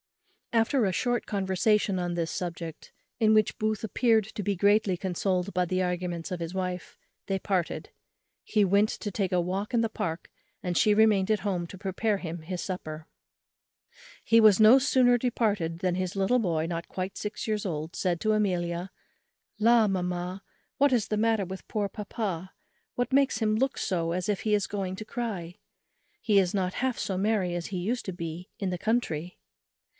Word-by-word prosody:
After 230 +3 +3
a 195 - +2
short 245 +6 -1
conversation 195 0 +1
on 175 -1 -2
this 165 -1 -1
subject, 170 -2 -5 0.3
in 220 -1 +4
which 215 -1 +2
Booth 215 0 -1
appeared 220 0 +2
to 210 - -3
be 200 +1 0
greatly 200 0 +3
consoled 185 +1 -1
by 180 0 +2
the 185 +1 0
arguments 180 -1 -2
of 180 - -3
his 165 +1 -4
wife, 180 -1 -4 0.3
they 195 - 0
parted. 185 -3 -2 0.5
He 210 -2 +2
went 200 +3 +3
to 205 - -4
take 195 -1 -1
a 180 - +2
walk 190 +6 -2
in - - +4
the 225 - 0
Park, 165 -5 -4 0.3
and 180 -1 -2
she 210 +4 +4
remained 210 -3 +4
at 210 -3 +1
home 180 -4 -2
to 190 - -10
prepare 200 +2 -1
him 170 -3 -6
his 175 +2 -5
dinner. 155 -4 -6 1.2
He 230 +1 +6
was 215 -2 +7
no 220 +5 +8
sooner 255 -3 +4
departed 205 -9 0
than 180 -1 0
his 185 0 -2
little 195 +6 +3
boy, 165 -7 0
not 170 0 -4
quite 190 +1 -4
six 210 +2 -5
years 215 -1 -1
old, 160 -1 -4
said 175 -3 0
to 215 0 +2
Amelia, 180 -3 0 0.7
"La! 230 0 +5
mamma, 180 0 -2 0.4
what 285 0 +5
is 240 -5 +2
the 215 - -1
matter 220 -1 +2
with 190 +1 -8
poor 210 -2 0
papa, 195 -3 -4 0.4
what 245 +1 -1
makes 275 -3 +3
him 215 -1 +1
look 265 +4 0
so 165 -3 -1
as 180 0 -2
if 205 -2 0
he 215 - 0
was 205 -2 0
going 195 -2 -3
to 215 - -7
cry? 205 -8 -5 0.6
he 210 -3 +3
is 185 0 +1
not 185 -2 0
half 260 -2 0
so 190 - -2
merry 195 -3 +1
as 175 -1 -3
he 190 - -4
used 225 +8 -1
to 190 - -3
be 170 0 -6
in 195 -2 -1
the 180 - -3
country." 180 -7 -1
195 Hz, 190 wpm, -28 LUFS, 180-215 Hz, 1.2 s, no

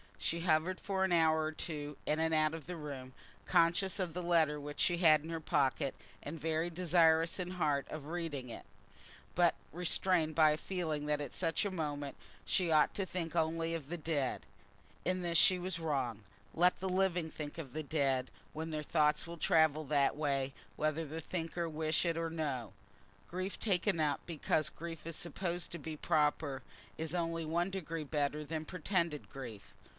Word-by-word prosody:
She 170 0 -1
hovered 170 +2 +2
for 190 -1 -1
an 190 - +1
hour 160 -2 +4
or 155 - -1
two 150 -2 -4
in 155 - +1
and 160 0 +2
out 155 0 +3
of 165 -3 -6
the 180 - -5
room, 140 -5 -7 0.3
conscious 180 +4 +3
of 180 -4 -1
the 180 +1 -3
letter 160 -4 +3
which 145 0 -7
she 175 - +3
had 155 -4 +6
in 160 - -7
her 165 -1 -2
pocket, 140 -2 +1 0.3
and 155 +3 -6
very 160 +2 0
desirous 165 -1 +3
in 180 0 -3
heart 150 -6 0
of 155 -2 -6
reading 155 -6 -4
it, 115 - -8 0.7
but 175 -2 +4 0.2
restrained 175 -1 +1
by 155 -1 +6
a 150 - 0
feeling 160 -5 -2
that 150 0 +1
at 145 - -5
such 165 +3 0
a 200 - -1
moment 145 -5 -3 0.3
she 180 -3 +2
ought 155 -1 +5
to 195 - 0
think 175 -3 -4
only 165 0 +1
of 150 -4 -6
the 175 - -3
dead. 150 -5 -1 0.6
In 185 0 +1
this 170 -1 +2
she 185 +2 +6
was 180 -1 -2
wrong. 135 -9 -1 0.3
Let 180 +2 +4
the 190 - -2
living 180 -3 +1
think 150 -1 -6
of 140 -7 -7
the 155 - -3
dead, 135 -4 +1 0.2
when 160 +1 -4
their 155 -1 -3
thoughts 150 0 +2
will 170 0 -7
travel 155 -1 +3
that 140 -1 +2
way 140 -3 0 0.2
whether 155 +4 0
the 160 +2 -5
thinker 170 +1 -3
wish 155 0 +1
it 165 -1 +1
or 165 0 -1
no. 140 - -3 0.6
Grief 185 +2 -3
taken 190 -3 +1
up 150 -2 +1
because 155 -2 0
grief 165 -1 -8
is 165 -1 -4
supposed 175 0 -3
to 170 - -5
be 155 +1 -6
proper, 150 -3 +1 0.4
is 160 0 -3
only 165 -2 -1
one 170 +4 0
degree 165 -4 -4
better 145 +1 -1
than 155 +1 -4
pretended 170 -4 -1
grief. 120 -7 -9
160 Hz, 185 wpm, -34 LUFS, 150-170 Hz, 0.7 s, had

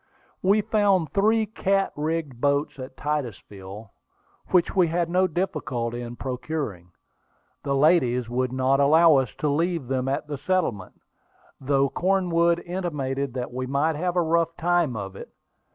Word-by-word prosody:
We 200 +3 +3
found 205 -6 +1
three 220 +2 +2
cat 195 -2 0
rigged 150 -4 -3
boats 140 0 0
at 130 0 -9
Titusville, 105 -8 -5 0.6
which 180 -2 +2
we 180 -3 +4
had 170 +1 -1
no 185 +1 +3
difficulty 125 -10 -3
in 120 0 -7
procuring. 125 - -5 0.7
The 140 -1 -1
ladies 135 -5 +3
would 125 +1 -1
not 130 +1 +1
allow 155 +2 +6
us 130 -3 +1
to 150 - -1
leave 165 -1 0
them 130 -1 -1
at 140 +3 -1
the 145 -2 -6
settlement, 155 - -2 0.6
though 140 0 +2
Cornwood 170 0 +1
intimated 140 -7 -3
that 125 -1 -4
we 130 0 -3
might 145 +4 +1
have 175 +3 -2
a 175 - +3
rough 165 0 +1
time 175 -6 +1
of 95 -2 -6
it. - - -9
150 Hz, 150 wpm, -25 LUFS, 130-175 Hz, 0.7 s, allow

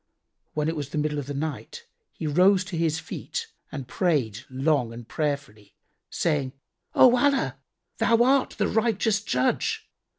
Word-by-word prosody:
When 150 0 0
it 165 - -1
was 145 -3 -4
the 155 - -4
middle 150 0 0
of 140 - -6
the 145 - -4
night, 160 - -5 0.3
he 160 - -6
rose 180 +6 +4
to 190 -2 -6
his 165 -1 +1
feet 460 - -5 0.3
and 135 -4 -6
prayed 130 - 0
long 135 -2 +1
and 115 -1 -10
prayerfully, 140 -10 -4 0.3
saying, 145 -6 0 0.4
"O 250 -1 +7
Allah, 275 +2 +1 0.4
Thou 230 0 +4
art 265 +1 +2
the 205 -2 +1
Righteous 220 -2 +1
Judge. 125 -10 0
155 Hz, 155 wpm, -26 LUFS, 140-205 Hz, 0.4 s, O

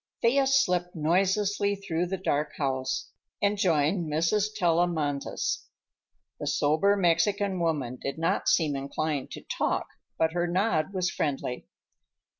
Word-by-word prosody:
Thea 270 +4 +4
slipped 180 -11 +2
noiselessly 195 +5 +1
through 180 -3 -2
the 190 +2 -2
dark 150 -5 -1
house 130 -2 -2 0.3
and 205 +1 +2
joined 165 -2 +1
Mrs. 165 +7 +2
Tellamantez. 165 -6 0 0.7
The - - -4
somber 160 +8 +3
Mexican 195 +2 +2
woman 145 -7 -1
did 140 +1 -4
not 165 +4 +1
seem 155 -4 +2
inclined 140 +1 -2
to - - -9
talk, - - -1 0.3
but 160 0 +1
her 175 0 0
nod 175 -2 +1
was 185 -1 -1
friendly. 135 -4 -3
170 Hz, 125 wpm, -28 LUFS, 150-195 Hz, 0.7 s, Thea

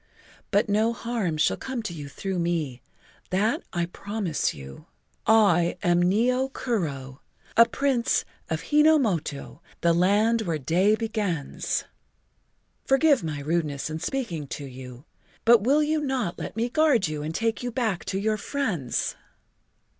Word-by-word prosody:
But 205 +1 +2
no 215 +3 +2
harm 230 -9 -2
shall 155 - +2
come 260 -3 -4
to 200 -5 -4
you 145 -3 -7
through 190 +5 -4
me—that 170 - -2
I 175 -1 0
promise 200 -1 -2
you. 70 -1 -11 0.4
I 190 -6 +4
am 175 0 +3
Nio 250 +8 +2
Kuro, 140 - -3 0.3
a 230 0 +7
Prince 270 -4 +1 0.2
of - - -4
Hi 295 - +3
no 315 +1 +6
moto, 170 - -2 0.2
the 170 0 +4
Land 205 +6 +3
Where 170 -7 -1
the 135 - -15
Day 190 +8 +3
Begins. 210 -9 -2 1.0
Forgive 270 - +3
my 150 -3 -3
rudeness 155 -1 -1
in 155 - -4
speaking 170 - -3
to 140 - -6
you, 130 0 -10 0.4
but 235 -1 +7
will 280 +7 +3
you 305 +1 0
not 260 -11 -2
let - - -6
me 230 +1 0
guard 265 - +3
you 155 -1 -4
and 155 +2 -4
take 225 0 0
you 245 - -2
back 225 -7 -1
to 190 - -2
your 215 +2 0
friends?" 200 - -2
200 Hz, 150 wpm, -26 LUFS, 160-235 Hz, 1.0 s, a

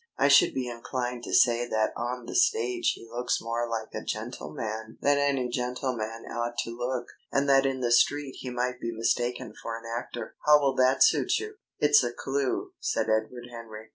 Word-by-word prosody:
I 140 - +4
should 145 - +6
be 130 -2 -1
inclined 120 0 -4
to - - -6
say 120 0 +4
that 110 -2 0
on 120 +1 -4
the - - -7
stage 120 +1 +2
he 115 - -13
looks 120 +2 -1
more 115 +1 -2
like 110 -1 -4
a - - -5
gentleman 110 +8 -5
than 145 0 +3
any 140 -3 +1
gentleman 125 -2 -3
ought 120 0 -3
to 115 - -7
look, 125 0 -2 0.3
and 140 +1 +1
that 135 0 +5
in 130 -1 -2
the 120 -1 0
street 140 +3 +3
he 130 - -5
might 125 0 -2
be 115 - -2
mistaken 120 +1 -1
for 115 0 -4
an 115 - -12
actor.... 120 +1 -5
How 150 0 +7
will 140 -2 +2
that 130 +1 +5
suit - - +3
you?" 430 -1 -6 0.2
"It's 145 -2 +5
a 120 - -1
clue," 135 +1 -2
said - - 0
Edward 120 +3 -1
Henry. 110 -2 -9
120 Hz, 195 wpm, -28 LUFS, 115-130 Hz, 0.3 s, How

